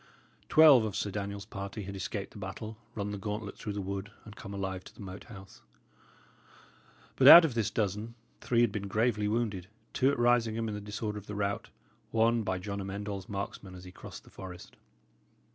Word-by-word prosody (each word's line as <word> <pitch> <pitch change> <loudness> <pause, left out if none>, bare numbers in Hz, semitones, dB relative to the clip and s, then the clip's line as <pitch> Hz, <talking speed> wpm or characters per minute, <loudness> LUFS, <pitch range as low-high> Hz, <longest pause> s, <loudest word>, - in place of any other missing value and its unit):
Twelve 150 -5 +8
of 110 -3 -3
Sir 100 - -2
Daniel's 100 0 -4
party 100 +1 -6
had 100 +1 -7
escaped 100 +1 -4
the - - -11
battle, 110 +3 -6 0.2
run 105 -1 -3
the 100 - -5
gauntlet 105 0 -4
through 105 -3 -5
the 100 -1 -3
wood, 100 +1 -4 0.2
and 105 -1 -11
come 100 - -9
alive 95 -2 -4
to - - -13
the - - -12
Moat 95 0 -8
House. 95 -4 -12 1.5
But - - +5
out 170 0 +12
of 150 - -1
this 115 -3 0
dozen, 105 +2 -2 0.2
three 120 -1 +2
had 120 -3 +3
been 100 -1 -4
gravely 105 0 +1
wounded: 105 -5 -1 0.3
two 130 - +3
at 140 - 0
Risingham 115 -2 +2
in 110 - -3
the 105 - -5
disorder 105 0 -4
of 105 - -16
the 105 - -5
rout, 100 0 -2 0.4
one 115 +1 +3
by 95 -3 -1
John 100 +2 -4
Amend 100 +2 -5
All's 100 -2 -5
marksmen 100 -1 -5
as 90 - -11
he 90 - -10
crossed - - -10
the - - -18
forest. 90 -2 -10
105 Hz, 200 wpm, -31 LUFS, 100-110 Hz, 1.5 s, out